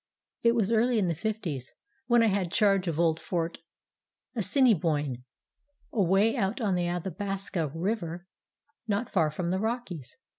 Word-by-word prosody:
"It 235 0 +4
was 220 -2 +1
early 235 +2 +3
in 190 -5 +2
the - - +1
Fifties, 165 - -4 0.3
when 240 -1 +5
I - - +5
had 195 -5 +1
charge 195 -3 +3
of 165 -1 -1
old 165 -2 +3
Fort 170 -2 -2 0.8
Assiniboine, 155 - +2 0.7
away 200 +2 +3
out 200 -1 0
on 210 -5 +1
the 175 -1 0
Athabasca 180 -2 -3
River, 175 -1 -2 0.6
not 210 +3 -1
far 160 -5 +3
from 170 +3 -3
the 190 - 0
Rockies. 215 - -4
190 Hz, 145 wpm, -28 LUFS, 165-220 Hz, 0.8 s, when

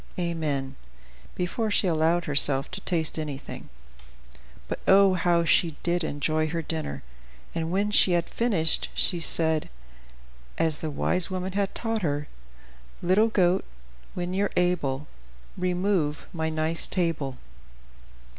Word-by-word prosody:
Amen" 150 -6 -2 0.6
before 215 +5 -2
she 205 - +2
allowed 165 0 +2
herself 140 -1 +2
to 185 +1 -5
taste 165 -4 +1
anything. 145 -3 -7 1.0
But - - -4
oh, 195 0 +6
how 170 -1 +2
she 165 -1 +3
did 175 0 0
enjoy 155 +1 -1
her 165 +1 -3
dinner! 155 - -4 0.5
and 165 0 -2
when 200 +4 0
she 190 -3 +5
had 170 -1 +1
finished, 195 -9 +2
she 175 - +2
said, 160 -1 +2 0.9
as 160 -2 +1
the 160 - -3
wise 175 +4 0
woman 185 0 -3
had 200 0 -2
taught 225 -1 -2
her: 145 -3 -2 0.8
"Little 190 +5 +4
goat, 185 -3 +2 0.5
when 180 0 -3
you're 200 +1 +1
able, 150 -6 0 0.5
Remove 180 -4 0
my 160 -2 -2
nice 160 +1 +1
table." 160 -8 -1
170 Hz, 125 wpm, -26 LUFS, 155-185 Hz, 1.0 s, oh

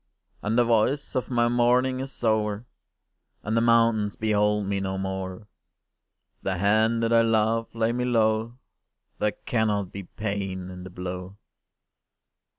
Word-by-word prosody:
And 110 +3 -1
the 120 - +5
voice 115 +5 +1
of 130 - -1
my 120 -2 +2
mourning 125 +2 +2
is 135 -1 -5
o'er, 110 0 +1 0.8
And 110 +2 -1
the 115 - +3
mountains 115 -3 +3
behold 105 -1 +1
me 100 0 -1
no 95 0 -3
more: 95 +1 -4 0.9
If - - -44
the 95 -1 -2
hand 110 +4 +2
that 115 0 +1
I 115 - +6
love 115 0 +2
lay 115 0 +1
me 125 +1 -1
low, 115 0 +1 0.6
There 105 -1 +1
cannot 105 -5 0
be 100 - -6
pain 95 -2 -4
in 90 0 -9
the 95 - -8
blow! 90 +2 -6
110 Hz, 150 wpm, -26 LUFS, 100-115 Hz, 0.9 s, I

